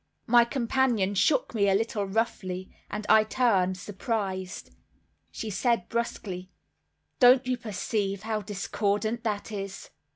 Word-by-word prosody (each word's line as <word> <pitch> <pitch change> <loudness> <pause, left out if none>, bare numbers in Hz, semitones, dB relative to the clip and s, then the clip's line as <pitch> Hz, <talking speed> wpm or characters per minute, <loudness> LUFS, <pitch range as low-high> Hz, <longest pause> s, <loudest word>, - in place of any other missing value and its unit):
My 240 -1 +6
companion 235 -5 +1
shook 255 +7 +2
me 200 -3 +2
a 195 - +4
little 210 -1 0
roughly, 190 -3 -2 0.2
and 210 0 -4
I 220 0 +6
turned 200 -6 +2
surprised. 195 -1 -4 0.6
She 220 - -5
said 220 0 0
brusquely, 195 -6 -3 0.7
"Don't 250 +1 +7
you 255 0 +1
perceive 205 -3 -3
how 220 -1 -2
discordant 210 +2 -1
that 215 -1 -2
is?" 195 -2 -6
215 Hz, 125 wpm, -27 LUFS, 195-235 Hz, 0.7 s, Don't